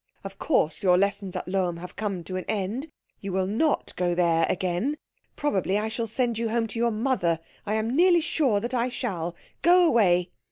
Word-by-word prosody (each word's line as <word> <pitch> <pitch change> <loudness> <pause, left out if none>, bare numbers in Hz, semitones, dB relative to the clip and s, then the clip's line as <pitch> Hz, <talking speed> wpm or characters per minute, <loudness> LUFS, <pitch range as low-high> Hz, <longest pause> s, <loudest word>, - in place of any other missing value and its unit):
Of - - -9
course 185 - +1
your 180 -3 +4
lessons 195 -1 -1
at - - -4
Lohm 180 -2 0
have 180 +1 -9
come 200 -4 -3
to 185 - -6
an 185 - -4
end. 215 +8 -2 0.3
You 195 - -5
will 190 0 0
not 230 +11 0
go 175 -1 0
there 170 -2 +2
again. 185 +10 -1 0.4
Probably 200 -9 0
I 215 +1 -1
shall 230 +1 -3
send 235 0 -1
you 230 -1 -1
home 230 0 +1
to 230 - -5
your 235 0 +3
mother. 215 -8 0 0.3
I 210 - 0
am 220 +3 -1
nearly 345 +1 +5
sure 275 -9 +1
that 240 +3 -4
I 245 0 +1
shall. 175 -9 -3 0.3
Go 355 +1 +6
away." 180 - +3
210 Hz, 200 wpm, -26 LUFS, 180-240 Hz, 0.4 s, Go